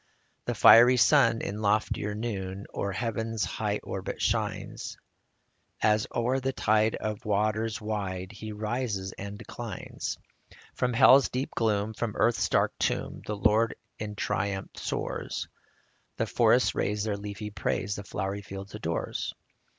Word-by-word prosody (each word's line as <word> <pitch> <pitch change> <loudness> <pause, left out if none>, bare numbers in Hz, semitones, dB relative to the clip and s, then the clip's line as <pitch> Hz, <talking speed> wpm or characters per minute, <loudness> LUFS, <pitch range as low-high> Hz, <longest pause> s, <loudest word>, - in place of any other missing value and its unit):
The - - -1
fiery 120 +2 +8
sun 115 -3 +5
in 105 +2 -4
loftier 105 0 +1
noon 100 -3 -4
O'er 100 - -2
heaven's 115 0 -2
high - - -2
orbit - - -5
shines, - - -2 0.8
As 105 0 +3
o'er 125 +3 +1
the 135 0 -1
tide 110 0 +2
of 110 +2 -4
waters 110 +1 0
wide 100 -4 -3
He 110 -1 -7
rises 105 -2 -2
and 100 +2 -7
declines. 110 -1 -6 0.3
57 - - -19
From 125 -1 0
hell's 135 +2 +7
deep 130 +2 -2
gloom, 110 -1 0
from 110 -1 -3
earth's 120 0 +2
dark - - +2
tomb, - - -1
The 105 - -2
Lord 110 +3 +3 0.2
in 105 -1 -5
triumph 100 -1 -2
soars; - - -3 0.7
The - - +1
forests - - +3
raise 105 0 0
their 105 -2 -1
leafy 105 +1 -6
praise; 100 +1 -1
The 100 - -5
flowery 95 +1 -3
field 95 0 -8
adores. 85 +1 -3
105 Hz, 140 wpm, -28 LUFS, 100-115 Hz, 0.8 s, fiery